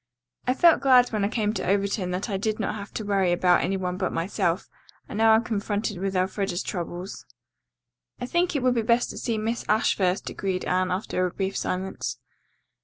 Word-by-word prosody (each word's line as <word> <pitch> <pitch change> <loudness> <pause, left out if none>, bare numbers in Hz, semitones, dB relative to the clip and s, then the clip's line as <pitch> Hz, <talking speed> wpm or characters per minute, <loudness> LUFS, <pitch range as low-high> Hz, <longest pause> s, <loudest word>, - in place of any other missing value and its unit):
"I 255 - +2
felt 335 0 +5
glad 255 -2 +6
when 215 -3 -1
I - - +3
came 215 -1 0
to - - -3
Overton 200 -1 0
that 180 +4 -2
I 205 - -2
did 215 +3 -1
not 210 - -1
have 205 -1 -7
to 220 - -3
worry 195 -3 +2
about 175 0 +3
any 195 +3 0
one 180 -1 -3
but 185 -1 -1
myself, 170 +1 -1 0.4
and - - -7
now 220 +1 +5
I'm 220 +1 +4
confronted 205 -3 -2
with 195 0 -2
Elfreda's 190 0 -1
troubles." 175 0 -5 1.0
"I 245 - -3
think 345 +5 0
it 275 - 0
would 255 -1 +4
be 235 - +1
best 235 +2 +2
to - - -9
see 230 -2 -1
Miss 225 +2 -2
Ashe 215 +1 +3
first," 185 0 0
agreed 190 -2 -2
Anne, 185 0 +1
after 185 0 -1
a - - -3
brief 195 +2 -3
silence. 190 +1 -3
200 Hz, 205 wpm, -25 LUFS, 185-220 Hz, 1.0 s, glad